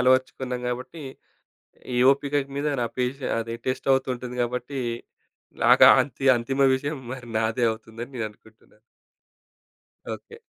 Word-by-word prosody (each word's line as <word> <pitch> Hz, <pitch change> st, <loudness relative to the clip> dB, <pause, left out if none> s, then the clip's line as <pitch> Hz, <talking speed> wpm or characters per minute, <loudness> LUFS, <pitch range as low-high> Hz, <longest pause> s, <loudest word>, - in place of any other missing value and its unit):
అలవరచుకున్నాం 130 Hz, 0 st, +1 dB
కాబట్టి 130 Hz, +6 st, -5 dB, 0.9 s
ఈ -, -, 0 dB
ఓపికకు 140 Hz, 0 st, 0 dB
మీద 145 Hz, +1 st, -1 dB
నా 120 Hz, -, +1 dB
పెషే 130 Hz, +2 st, -2 dB
అది 115 Hz, 0 st, -4 dB
టెస్ట్ 130 Hz, +1 st, -2 dB
అవుతుంటుంది 125 Hz, -2 st, -1 dB
కాబట్టి 125 Hz, +3 st, -3 dB, 0.8 s
నాకు -, -, +7 dB
ఆ -, -, +9 dB
అంతి 135 Hz, 0 st, -8 dB
అంతిమ 135 Hz, +4 st, -1 dB
విషయం 145 Hz, +3 st, -3 dB, 0.2 s
మరి 125 Hz, -2 st, -8 dB
నాదే 110 Hz, +2 st, 0 dB
అవుతుందని 115 Hz, +3 st, -8 dB
నేను 115 Hz, -2 st, -2 dB
అనుకుంటున్నాను. 110 Hz, 0 st, -23 dB, 1.4 s
ఓకే. 460 Hz, -, -13 dB
125 Hz, 125 wpm, -25 LUFS, 120-135 Hz, 1.4 s, ఆ